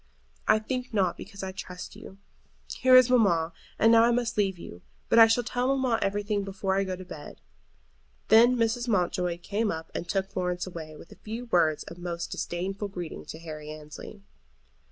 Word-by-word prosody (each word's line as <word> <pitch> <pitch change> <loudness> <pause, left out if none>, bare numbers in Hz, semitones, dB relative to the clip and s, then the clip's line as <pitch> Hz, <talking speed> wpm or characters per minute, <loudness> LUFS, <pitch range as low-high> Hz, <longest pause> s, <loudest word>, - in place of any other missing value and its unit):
"I - - +6
think 250 +2 -4
not, 185 -4 +2
because 200 0 -9
I 190 - -3
trust 185 -1 -8
you. 195 - -12 0.6
Here 255 0 +5
is 255 -1 +8
mamma, 170 -9 +3 0.2
and 225 - +5
now 230 0 +7
I 235 - +4
must 240 0 0
leave 195 -3 +1
you. 90 - -10 0.3
But 230 - +5
I 225 - +10
shall 225 +2 +2
tell 245 +2 -1
mamma 250 -4 +1
everything 205 +1 -1
before 190 0 -2
I 195 - +2
go 190 -1 -3
to 185 0 -10
bed." 150 -5 -10 0.9
Then 235 +3 +7
Mrs. 235 +1 0
Mountjoy 180 -4 0
came 210 +2 -1
up 160 -2 -5
and 175 - -5
took 195 0 -1
Florence 180 -2 -2
away, 160 -4 -8
with 160 - -14
a - - -13
few 225 +3 -6
words 160 -8 +2
of 170 - -11
most 170 -1 -4
disdainful 195 +4 -3
greeting 180 -4 -7
to - - -8
Harry 155 -2 -8
Annesley. 155 +7 -10
195 Hz, 190 wpm, -27 LUFS, 175-225 Hz, 0.9 s, I